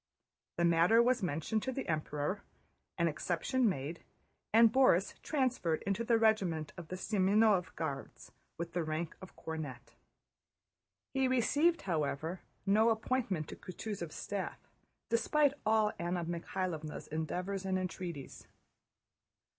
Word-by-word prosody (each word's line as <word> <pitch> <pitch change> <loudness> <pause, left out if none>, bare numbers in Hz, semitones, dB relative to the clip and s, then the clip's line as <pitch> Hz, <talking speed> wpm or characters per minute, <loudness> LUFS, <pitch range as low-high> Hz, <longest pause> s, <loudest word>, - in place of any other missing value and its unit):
The 170 - +3
matter 170 +7 +5
was 245 0 +4
mentioned 175 +5 -1
to 260 - -2
the 265 +1 -4
Emperor, 155 +4 -1 0.6
an 170 -1 +3
exception 180 - +1
made, 155 -1 -4 0.5
and 225 0 +6
Borís 255 -8 +3
transferred 255 - 0
into 200 +3 -1
the 230 0 +3
regiment 190 -9 +2
of 175 -3 -8
Semënov 195 +1 +2
Guards 140 -4 -5 0.3
with 170 0 -5
the 175 -1 0
rank 155 +1 -3
of 190 - -11
cornet. 150 -7 -6 1.2
He 265 -1 +2
received, 290 +7 +3
however, 160 0 -2 0.2
no 215 +3 +5
appointment 220 -7 0
to - - -6
Kutúzov's 185 -3 -6
staff 200 -2 -4 0.5
despite 280 +5 +3
all 215 -1 +4
Anna 175 0 -1
Mikháylovna's 170 -2 -3
endeavors 180 +5 -3
and 190 -1 0
entreaties. 175 -6 -5
185 Hz, 120 wpm, -33 LUFS, 160-225 Hz, 1.2 s, and